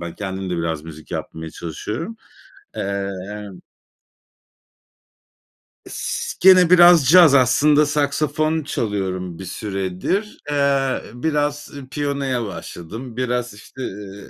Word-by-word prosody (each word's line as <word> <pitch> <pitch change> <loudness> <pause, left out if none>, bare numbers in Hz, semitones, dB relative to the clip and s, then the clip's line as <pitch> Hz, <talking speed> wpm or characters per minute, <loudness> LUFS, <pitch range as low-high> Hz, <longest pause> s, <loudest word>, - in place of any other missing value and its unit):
ben, 85 -1 -6
kendim 95 -2 -5
de 90 - -1
biraz 80 -2 -2
müzik 80 -1 -11
yapmaya 80 0 -6
çalışıyorum. 105 - -6 0.6
Eee, 100 0 -2 0.2
yani 105 -3 -8 2.3
S - - -4
gene 185 -2 +7
biraz 175 -4 +7
caz 170 -4 +8
aslında, 145 +4 +4
saksafon 150 +2 0
çalıyorum 95 - -3
bir 95 - -7
süredir. 95 - -3
Eee, 140 -2 +1
biraz 145 +2 -2 0.2
piyanoya 140 -4 -2
başladım. 110 +5 -8
Biraz, 125 -2 -1
işte, 110 +5 -12
iii 100 0 -10
125 Hz, 105 wpm, -21 LUFS, 95-145 Hz, 2.3 s, caz